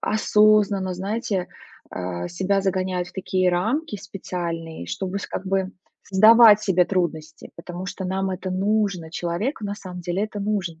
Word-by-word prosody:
осознанно, 210 Hz, -3 st, +3 dB
знаете, 195 Hz, 0 st, -2 dB, 0.4 s
а, 90 Hz, -1 st, -4 dB
себя 195 Hz, +3 st, 0 dB
загоняют 185 Hz, -2 st, -1 dB
в 180 Hz, -, -16 dB
такие 185 Hz, -1 st, 0 dB
рамки 220 Hz, -, -1 dB
в -, -, -13 dB
специальные, 170 Hz, -, -5 dB
чтобы 185 Hz, -, -3 dB
с -, -, -6 dB
как 190 Hz, -, -6 dB
бы 190 Hz, 0 st, 0 dB, 0.3 s
создавать 215 Hz, +2 st, +7 dB
себе 185 Hz, -3 st, +3 dB
трудности, 160 Hz, -4 st, -3 dB
потому 175 Hz, +2 st, -7 dB
что 195 Hz, 0 st, -5 dB
нам 190 Hz, +1 st, -1 dB
это 185 Hz, 0 st, -4 dB
нужно. 195 Hz, -3 st, 0 dB
Человеку 175 Hz, -, -3 dB
на 200 Hz, 0 st, -3 dB
самом 185 Hz, -3 st, -9 dB
деле 175 Hz, +4 st, -1 dB
это 210 Hz, -1 st, -6 dB
нужно. 195 Hz, -6 st, -2 dB
190 Hz, 155 wpm, -23 LUFS, 175-205 Hz, 0.4 s, создавать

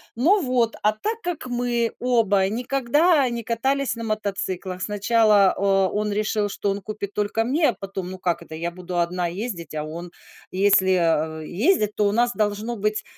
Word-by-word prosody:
Ну 355 Hz, -, +3 dB
вот, 250 Hz, -4 st, +1 dB
а 210 Hz, +1 st, +3 dB
так 440 Hz, -, -4 dB
как 350 Hz, -8 st, -4 dB
мы 240 Hz, -1 st, 0 dB
оба 220 Hz, -6 st, +2 dB
никогда 275 Hz, -, +2 dB
не 235 Hz, -1 st, -4 dB
катались 260 Hz, +2 st, 0 dB
на 230 Hz, -, -6 dB
мотоциклах, 195 Hz, -4 st, -3 dB
сначала, 210 Hz, -1 st, +3 dB
э, -, -, -5 dB, 0.3 s
он 210 Hz, 0 st, -1 dB
решил, 210 Hz, 0 st, 0 dB
что 200 Hz, -, -2 dB
он 200 Hz, 0 st, -4 dB
купит 205 Hz, 0 st, -6 dB
только 210 Hz, +2 st, 0 dB
мне, 295 Hz, +6 st, +2 dB
а -, -, 0 dB
потом, 190 Hz, -2 st, -6 dB
ну, 185 Hz, -, -7 dB
как 175 Hz, -2 st, -1 dB
это, 160 Hz, -1 st, -9 dB
я 170 Hz, +2 st, -3 dB
буду 180 Hz, 0 st, -4 dB
1 175 Hz, +1 st, 0 dB
ездить, 175 Hz, -4 st, -5 dB
а 150 Hz, -, -2 dB
он? 170 Hz, +3 st, -7 dB, 0.4 s
Если, 190 Hz, -1 st, +4 dB
а, 160 Hz, -2 st, +1 dB
ездить, 210 Hz, -, +1 dB
то 210 Hz, -1 st, +2 dB
у -, -, +1 dB
нас 240 Hz, +3 st, +2 dB
должно 215 Hz, +2 st, -1 dB
быть, 210 Hz, +1 st, -1 dB
210 Hz, 180 wpm, -23 LUFS, 185-240 Hz, 0.4 s, Если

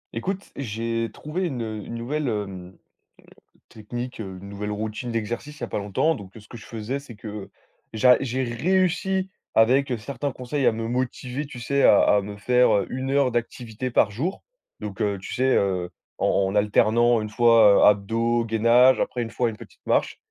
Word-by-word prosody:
Écoute, 195 Hz, +11 st, -4 dB
j'ai 115 Hz, -2 st, -3 dB
trouvé 155 Hz, -, -4 dB
une, 125 Hz, -6 st, -4 dB
heu, 110 Hz, -1 st, -5 dB
une 115 Hz, -, -7 dB
nouvelle 140 Hz, +5 st, -3 dB
hem, 95 Hz, -5 st, -4 dB
mmh, -, -, -25 dB, 0.9 s
technique, 120 Hz, +3 st, -7 dB
heu, 95 Hz, -3 st, -7 dB
une 100 Hz, -, -10 dB
nouvelle 100 Hz, +1 st, -5 dB
routine 110 Hz, +3 st, -4 dB
d'exercice 120 Hz, +6 st, -4 dB
il -, -, -21 dB
y -, -, -3 dB
a -, -, -12 dB
pas -, -, -4 dB
longtemps. 105 Hz, +11 st, 0 dB
Donc, 95 Hz, -3 st, -10 dB
ce 105 Hz, -1 st, -14 dB
que -, -, -12 dB
je 110 Hz, -, -13 dB
faisais, 115 Hz, +4 st, -4 dB
c'est 135 Hz, -5 st, -12 dB
que 105 Hz, -2 st, -8 dB, 0.4 s
j'a 125 Hz, +3 st, +5 dB
j'ai 130 Hz, 0 st, -1 dB
réussi 185 Hz, +8 st, 0 dB, 0.3 s
avec, 130 Hz, +5 st, +4 dB
heu, 120 Hz, -, 0 dB
certains 140 Hz, +5 st, -4 dB
conseils 130 Hz, +2 st, -3 dB
à -, -, +5 dB
me 115 Hz, 0 st, -4 dB
motiver, 125 Hz, +3 st, -3 dB
tu 135 Hz, -3 st, -10 dB
sais, 140 Hz, +3 st, 0 dB
à 105 Hz, -, +7 dB
à 105 Hz, -, +4 dB
me 100 Hz, +1 st, -8 dB
faire, 125 Hz, +4 st, +3 dB
heu, 100 Hz, -, +1 dB
1 130 Hz, +1 st, -3 dB
heure 140 Hz, -2 st, +3 dB
d'activité 120 Hz, +1 st, -4 dB
par 110 Hz, -, +3 dB
jour. 145 Hz, -, -3 dB, 0.4 s
Donc 105 Hz, 0 st, -6 dB
heu, 100 Hz, -2 st, 0 dB
tu 95 Hz, -, -7 dB
sais, 130 Hz, +1 st, +2 dB
heu, 90 Hz, -3 st, 0 dB, 0.3 s
en -, -, 0 dB, 0.2 s
en 95 Hz, -, -3 dB
alternant 110 Hz, +3 st, +3 dB
une 105 Hz, -, -5 dB
fois, 115 Hz, -3 st, +5 dB
heu, -, -, +5 dB
abdos, 115 Hz, +3 st, +2 dB
gainage, 115 Hz, +3 st, +4 dB
après 125 Hz, -, -2 dB
une 115 Hz, -1 st, -4 dB
fois 120 Hz, -2 st, 0 dB
une 110 Hz, -, -8 dB
petite -, -, -15 dB
marche. -, -, +1 dB
115 Hz, 200 wpm, -24 LUFS, 105-130 Hz, 0.9 s, à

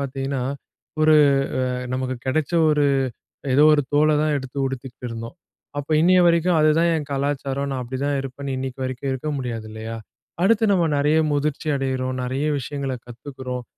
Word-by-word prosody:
பார்த்தீங்கன்னா, 135 Hz, -1 st, -3 dB, 0.6 s
ஒரு 155 Hz, 0 st, +6 dB, 0.6 s
அ 125 Hz, -, -2 dB, 0.2 s
நமக்கு 130 Hz, 0 st, -2 dB
கிடைச்ச 150 Hz, +3 st, 0 dB, 0.2 s
ஒரு 150 Hz, -1 st, +3 dB, 0.7 s
ஏதோ 145 Hz, -, +5 dB
ஒரு 145 Hz, -, +3 dB
தோல 150 Hz, +1 st, +4 dB
தான் 150 Hz, -1 st, +1 dB
எடுத்து 135 Hz, 0 st, -8 dB
உடுத்துக்கிட்டு 130 Hz, -1 st, -6 dB
இருந்தோம். 115 Hz, +6 st, -7 dB, 0.4 s
அப்ப 145 Hz, +1 st, -4 dB
இன்னைய 185 Hz, +2 st, +5 dB
வரைக்கும் 170 Hz, 0 st, +3 dB
அதுதான் 155 Hz, +2 st, +4 dB
என் 150 Hz, -3 st, -3 dB
கலாச்சாரம், 140 Hz, 0 st, -2 dB
நான் 130 Hz, -2 st, -3 dB
அப்பிடி 130 Hz, +2 st, -5 dB
தான் 145 Hz, -1 st, 0 dB
இருப்பேன்னு 135 Hz, 0 st, -5 dB
இன்னக்கி 130 Hz, 0 st, -5 dB
வரைக்கும் 130 Hz, +1 st, -3 dB
இருக்க 130 Hz, +4 st, -3 dB
முடியாது 115 Hz, -4 st, -4 dB
இல்லயா? 110 Hz, +1 st, -6 dB, 0.5 s
அடுத்து 225 Hz, +2 st, +4 dB
நம்ம 185 Hz, -3 st, +3 dB
நெறைய 150 Hz, +2 st, +3 dB
முதிர்ச்சி 150 Hz, +1 st, -1 dB
அடையிறோம். 130 Hz, -1 st, -2 dB
நெறைய 130 Hz, +4 st, -2 dB
விஷயங்கள 135 Hz, 0 st, -4 dB
கத்துக்கிறோம். 125 Hz, 0 st, -7 dB
135 Hz, 155 wpm, -22 LUFS, 130-150 Hz, 0.7 s, ஒரு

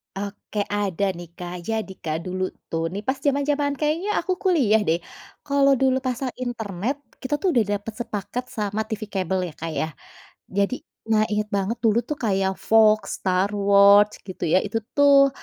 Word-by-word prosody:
Oke 200 Hz, +1 st, -5 dB
ada 200 Hz, -3 st, -1 dB
nih 175 Hz, 0 st, -8 dB
Kak 175 Hz, 0 st, -6 dB
jadi 220 Hz, -3 st, -2 dB
kan 155 Hz, -1 st, -1 dB
dulu 185 Hz, 0 st, -2 dB, 0.3 s
tuh 165 Hz, 0 st, -1 dB
nih 200 Hz, -, -3 dB
pas 265 Hz, +1 st, +1 dB
zaman-zaman 285 Hz, 0 st, +1 dB
kayaknya 315 Hz, +6 st, 0 dB
aku 370 Hz, +2 st, -1 dB
kuliah 275 Hz, -, +4 dB
deh 160 Hz, +1 st, +3 dB, 0.5 s
kalau 280 Hz, -1 st, +4 dB
dulu 260 Hz, -1 st, +4 dB
pasang 255 Hz, 0 st, -2 dB
internet 225 Hz, 0 st, -3 dB, 0.3 s
kita 260 Hz, +2 st, -3 dB
tuh 380 Hz, -, +2 dB
udah 240 Hz, -4 st, +4 dB
dapet 210 Hz, +2 st, -8 dB
sepaket 215 Hz, +1 st, -4 dB
sama 210 Hz, 0 st, -1 dB
TV 220 Hz, -1 st, -4 dB
kabel 190 Hz, -1 st, 0 dB
ya -, -, -20 dB
Kak 165 Hz, 0 st, -3 dB
ya. 155 Hz, -, 0 dB, 0.7 s
Jadi 200 Hz, +5 st, +2 dB, 0.4 s
nah 215 Hz, -1 st, +4 dB
ingat 210 Hz, 0 st, -1 dB
banget 200 Hz, +3 st, -1 dB
dulu 225 Hz, 0 st, +4 dB
tuh 300 Hz, -, -1 dB
kayak 190 Hz, -3 st, +1 dB
Fox, 215 Hz, -1 st, +3 dB
Star 185 Hz, +1 st, +1 dB
Watch 200 Hz, 0 st, +6 dB
gitu 185 Hz, -2 st, -7 dB
ya 160 Hz, -, +4 dB
itu 215 Hz, +2 st, -2 dB, 0.2 s
tuh, 280 Hz, -1 st, +7 dB
210 Hz, 170 wpm, -24 LUFS, 195-260 Hz, 0.7 s, tuh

